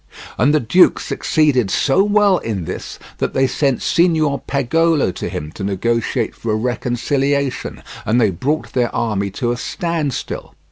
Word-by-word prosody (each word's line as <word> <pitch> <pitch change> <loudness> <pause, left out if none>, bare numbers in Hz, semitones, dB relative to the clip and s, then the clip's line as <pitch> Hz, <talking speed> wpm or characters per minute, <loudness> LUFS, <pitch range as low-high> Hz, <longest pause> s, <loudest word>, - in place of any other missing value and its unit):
And 130 +6 +3
the 155 - +3
duke 150 +10 +4
succeeded 140 -9 +1
so 145 - +3
well 205 -2 +3
in 100 -7 -4
this - - -6 0.2
that - - -2
they 135 - +3
sent 135 0 0
Signor 160 -5 +2
Pagolo 145 - +2
to - - -5
him 75 +1 -5
to 95 - -8
negotiate 110 +4 -1
for 115 - -4
a - - +2
reconciliation, 130 +4 -1 0.2
and 115 +4 +2
they 110 -4 +3
brought 145 - -2
their 120 -2 +1
army 105 -4 -1
to 120 +4 -2
a 120 - -2
standstill. 165 0 -3
130 Hz, 155 wpm, -18 LUFS, 115-155 Hz, 0.2 s, duke